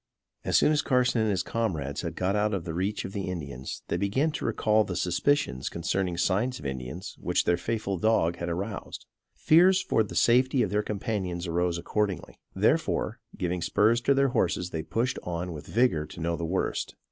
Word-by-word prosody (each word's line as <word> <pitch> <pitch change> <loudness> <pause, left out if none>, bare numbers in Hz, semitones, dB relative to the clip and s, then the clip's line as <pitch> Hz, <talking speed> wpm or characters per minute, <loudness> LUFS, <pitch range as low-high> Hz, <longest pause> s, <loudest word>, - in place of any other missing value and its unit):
As - - +3
soon - - +4
as 150 -1 +3
Carson 125 -3 +2
and 110 - +1
his 95 -4 0
comrades 80 -13 -2
had - - -5
got 95 +2 0
out 105 0 +1
of 90 -4 -4
the 80 - -4
reach 95 +5 -2
of 95 - -7
the 100 -2 -3
Indians 70 -7 -6
they - - -1
began 130 +11 +1
to 150 - -4
recall 110 0 +2
the 95 - -5
suspicions 90 - 0
concerning 90 +1 -2
signs 100 +8 +1
of 75 - -11
Indians 65 +6 -5
which - - +1
their 85 - +3
faithful 100 0 -2
dog 85 -5 +2
had 85 0 -3
aroused. 95 +5 -5 0.3
Fears 180 +4 +5
for 115 - +1
the 105 - -4
safety 125 +2 +4
of 100 - -2
their 105 +1 +2
companions 100 -4 -3
arose 85 0 0
accordingly. 100 +2 -2 0.2
Therefore, - - +1 0.2
giving 90 0 -2
spurs 110 +7 +3
to 140 +3 +3
their 140 0 +3
horses 90 -5 0
they 80 - -2
pushed 115 +11 -1
on 90 0 -4
with 75 - -9
vigor 110 -10 +2
to 80 - -11
know 85 0 -1
the 85 - -3
worst. 95 +3 -2
95 Hz, 195 wpm, -27 LUFS, 85-115 Hz, 0.3 s, Fears